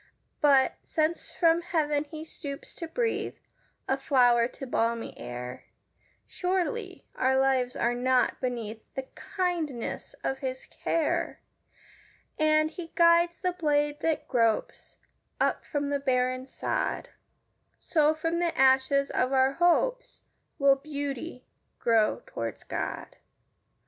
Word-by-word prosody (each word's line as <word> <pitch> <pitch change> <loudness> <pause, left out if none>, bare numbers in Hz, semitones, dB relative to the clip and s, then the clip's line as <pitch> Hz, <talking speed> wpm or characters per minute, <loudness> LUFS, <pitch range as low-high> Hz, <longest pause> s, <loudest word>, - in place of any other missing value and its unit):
But, 275 -3 +4
since 315 +2 -1
from 335 -1 +3
heaven 305 -4 0
he 310 +1 -8
stoops 285 -2 -8
to 335 - -6
breathe 460 +7 -1 0.5
A 265 - +1
flower 245 -4 +4
to 270 - -9
balmy 230 -2 -1
air, 125 +1 -7 0.6
Surely 375 +2 -2
our 265 +1 +2
lives 260 -2 +2
are 235 - +1
not 250 +1 +1
beneath 230 -4 -3
The 265 - -3
kindness 335 - -3
of 270 - -1
his 260 -1 -4
care; 325 -2 -1 1.0
And, 310 0 +3
as - - -20
he 330 -2 -6
guides 340 0 +5
the 365 - 0
blade 295 -4 0
that 320 -1 -1
gropes 230 -4 0 0.4
Up - - +1
from 285 -1 -2
the 285 - +1
barren 255 -1 0
sod, - - -2 0.7
So, 310 -1 +2
from 330 +2 -1
the 340 -1 0
ashes 265 +1 +4
of 255 +1 +1
our 265 0 +3
hopes, - - +1 0.3
Will 275 -1 +5
beauty 280 -1 -5 0.3
grow 225 -2 +2
toward 115 -2 -6
God. - - -4
285 Hz, 125 wpm, -28 LUFS, 255-330 Hz, 1.0 s, guides